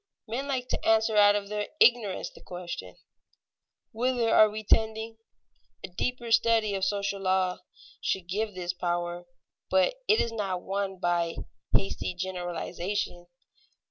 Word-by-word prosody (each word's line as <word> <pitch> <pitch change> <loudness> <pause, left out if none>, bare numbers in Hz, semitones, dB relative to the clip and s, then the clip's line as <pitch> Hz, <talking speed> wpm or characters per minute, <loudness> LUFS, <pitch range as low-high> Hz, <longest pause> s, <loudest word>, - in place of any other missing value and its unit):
Men 250 +6 -3
like 260 -3 -2
to - - -2
answer 220 0 +3
out 205 0 +7
of 205 -1 -2
their 210 0 -3
ignorance 230 -6 +3
the - - -16
question, 175 - -7 1.0
Whither 240 0 +1
are 215 - +7
we 215 +1 -6
tending? 220 +1 +1 0.7
A - - -5
deeper 240 +5 -3
study 225 -2 +3
of 195 -1 -2
social 200 0 -1
law 185 -1 +1 0.4
should 185 -3 -1
give 205 +2 -2
this 180 -1 -3
power, 175 0 -3 0.4
but 190 - +3
it 430 - +5
is 230 - +1
not 195 -5 -3
won 195 -1 -2
by 175 -2 0 0.4
hasty 195 -2 -3
generalization. 175 0 -3
200 Hz, 140 wpm, -28 LUFS, 180-220 Hz, 1.0 s, out